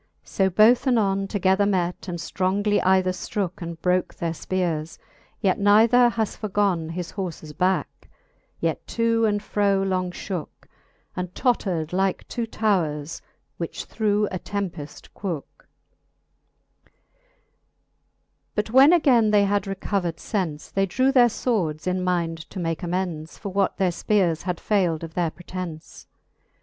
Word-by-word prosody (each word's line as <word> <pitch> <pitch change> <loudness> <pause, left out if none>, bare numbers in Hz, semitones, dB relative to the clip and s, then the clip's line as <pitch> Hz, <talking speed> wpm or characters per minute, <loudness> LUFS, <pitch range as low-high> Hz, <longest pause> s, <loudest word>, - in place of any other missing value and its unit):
So 190 -1 +1
both 230 +7 +5
anon 195 -5 +2
Together 195 0 +2
met, 180 -2 -1
and 175 -1 -3
ftrongly 195 +4 0
either 185 0 +3
ftrooke, 185 0 -4
And 170 -1 -6
broke 180 0 +1
their 170 -1 -2
fpeares; 165 -2 -2 0.4
yet 190 -4 +2
neither 225 +4 +5
has 225 -2 -2
forgoa 195 -6 0
His 175 +1 -5
horfes 170 -6 -6
bicke, 185 +4 -1 0.5
yet - - -2
to 230 0 +3
and 205 -1 0
fro 200 -2 +1
long 185 -2 -1
{hooke, 180 -2 -6 0.5
And 180 -1 -4
tottred 185 -10 0
Hke 190 +2 -1
two 235 -1 -3
towres, 165 -9 -1 0.4
which 170 - -5
through 210 -1 0
a 185 - -3
tempeft 180 -8 -5
quooke. 175 -8 -6 1.2
X. - - -34 1.6
But 215 +1 -1
when 270 +6 +7
againe 250 -10 +4
they 205 -1 +4
had 200 0 0
recovered 190 -3 -2
fence, 170 -8 -3
They 195 0 +1
drew 260 +8 +2
their 250 -3 +6
fwords, 175 -10 -1
in 185 0 0
mind 165 -3 -1
to 190 - -7
make 165 -1 -2
amends 175 -3 -3
For 200 - -6
what 195 0 0
their 185 -2 +2
fpeares 175 -3 +1
had 180 -1 -3
fayld 175 -6 0
of 165 -1 -7
their 175 -1 0
pretence. 175 -1 -8
190 Hz, 140 wpm, -24 LUFS, 170-205 Hz, 1.6 s, when